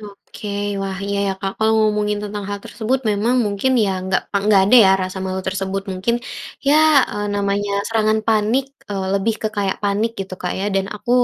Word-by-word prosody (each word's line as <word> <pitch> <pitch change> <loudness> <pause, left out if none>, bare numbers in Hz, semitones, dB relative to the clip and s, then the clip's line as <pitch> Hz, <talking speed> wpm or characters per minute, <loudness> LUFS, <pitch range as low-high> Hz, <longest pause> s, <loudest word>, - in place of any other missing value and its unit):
Oke 210 0 -10 0.3
wah 195 -1 -3
iya 200 0 -1
ya - - +1
Kak, 195 0 -2
kalau 220 0 +3
ngomongin 210 -1 +1
tentang 205 0 -5
hal 205 - -2
tersebut 245 +4 -1
memang 210 +4 +1
mungkin 205 +6 0
ya 200 - 0 0.2
nggak 190 0 +1
pe 200 - +1
nggak 200 -3 +5
ada 210 +6 +6
ya - - +5
rasa 185 +1 -4
malu 190 0 -2
tersebut 195 +1 -2
mungkin 190 +6 0 0.5
ya, 295 - +6 0.3
eee, 205 0 -3
namanya 200 0 -1 0.2
serangan 220 -1 +2
panik, 220 +4 +2 0.3
eee, 195 -2 -2
lebih 200 +3 +1
ke 215 - +1
kayak 195 -2 0
panik 205 +3 +1
gitu 190 -1 -5
Kak 180 - -1
ya? 195 - -2
Dan 195 0 +1
aku 210 +3 -6
205 Hz, 200 wpm, -20 LUFS, 195-215 Hz, 0.5 s, ada